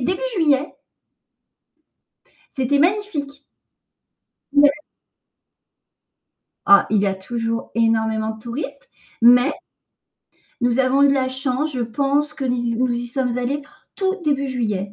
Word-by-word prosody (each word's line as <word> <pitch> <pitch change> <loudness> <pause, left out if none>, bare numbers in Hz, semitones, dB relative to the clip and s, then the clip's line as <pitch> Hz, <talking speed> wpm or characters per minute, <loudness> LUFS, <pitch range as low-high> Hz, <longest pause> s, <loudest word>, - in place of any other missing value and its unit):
début 365 - -1 0.2
juillet. 295 -4 +1 1.8
C'était 265 +2 +1
magnifique! 310 -6 -1 1.1
Ouais. 285 0 +6 2.0
Ah, 200 0 +6
il 215 - +3
y 200 - +1
a 195 - 0
toujours 230 +3 -4
énormément 220 -1 +1
de 220 - -8
touristes, 275 +5 -7 0.3
mais 245 +4 +6 1.1
nous 245 +1 +1
avons 265 +1 +3
eu 280 - +6
de 275 - +3
la 260 -1 0
chance, 265 +3 -2
je 255 - -3
pense 280 +6 0
que 275 - -5
ni 245 -2 -1
z 230 - -3
nous 255 +1 +1
y 240 0 -2
sommes 250 -1 -2
allés 275 +4 -2 0.3
tout 380 -1 0
début 280 -2 0
juillet, 210 -6 -3
255 Hz, 130 wpm, -21 LUFS, 230-285 Hz, 2.0 s, Ouais